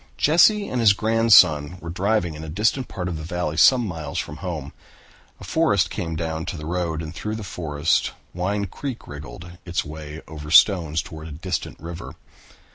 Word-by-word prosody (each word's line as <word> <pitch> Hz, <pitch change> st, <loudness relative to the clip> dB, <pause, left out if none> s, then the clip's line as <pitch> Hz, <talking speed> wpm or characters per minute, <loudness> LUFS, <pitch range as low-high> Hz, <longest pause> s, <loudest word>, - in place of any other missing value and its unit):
Jesse 200 Hz, +7 st, +4 dB
and 125 Hz, -, -1 dB
his 105 Hz, -3 st, +6 dB
grandson 95 Hz, -8 st, +4 dB
were 85 Hz, -1 st, -7 dB
driving 95 Hz, -2 st, 0 dB
in 75 Hz, +1 st, -8 dB
a 80 Hz, -, -7 dB
distant 110 Hz, -, 0 dB
part 90 Hz, -2 st, -5 dB
of 85 Hz, -3 st, -3 dB
the 80 Hz, -, -7 dB
valley 85 Hz, -1 st, -3 dB
some 125 Hz, +8 st, +5 dB
miles 80 Hz, -5 st, -5 dB
from 75 Hz, -, -4 dB
home. 80 Hz, -7 st, -5 dB, 0.7 s
A -, -, -11 dB
forest -, -, +2 dB
came 80 Hz, -2 st, -3 dB
down 80 Hz, -1 st, -3 dB
to -, -, -4 dB
the 75 Hz, -, -7 dB
road 85 Hz, -1 st, -2 dB
and 80 Hz, +1 st, -7 dB
through 105 Hz, +6 st, -4 dB
the 110 Hz, -, -6 dB
forest 80 Hz, -3 st, 0 dB, 0.2 s
Wine 100 Hz, +3 st, -1 dB
Creek 125 Hz, +6 st, -6 dB
wriggled 85 Hz, +4 st, -10 dB
its 90 Hz, -1 st, -2 dB
way 75 Hz, +1 st, -8 dB
over 75 Hz, -1 st, -8 dB
stones 85 Hz, -2 st, +5 dB
toward 80 Hz, -4 st, -9 dB
a -, -, -9 dB
distant 85 Hz, +3 st, -4 dB
river. 85 Hz, +1 st, -8 dB
85 Hz, 185 wpm, -23 LUFS, 80-100 Hz, 0.7 s, his